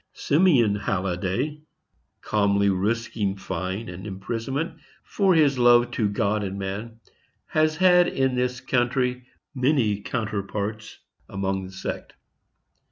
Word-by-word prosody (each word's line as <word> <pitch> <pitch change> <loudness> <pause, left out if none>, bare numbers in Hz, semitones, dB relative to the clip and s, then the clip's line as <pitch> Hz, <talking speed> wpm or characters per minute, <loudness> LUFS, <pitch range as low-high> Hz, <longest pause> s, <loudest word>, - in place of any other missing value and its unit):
Simeon 140 - +3
Halliday, 100 - -2 0.6
calmly 100 -1 +2
risking 105 0 -1
fine 95 +3 -4
and 90 +3 -8
imprisonment 115 - -4 0.2
for 195 -3 +2
his 145 -5 +3
love 120 0 +5
to 110 -4 0
God 105 +1 0
and 95 0 -4
man, 105 +4 -5 0.5
has 155 0 +1
had 180 -1 +5
in 130 -4 0
this 125 0 -1
country 125 0 0 0.3
many 125 -6 +1
counterparts 105 -1 -4 0.3
among 95 -1 -2
the - - -12
sect. 95 - -6
115 Hz, 110 wpm, -24 LUFS, 100-130 Hz, 0.6 s, love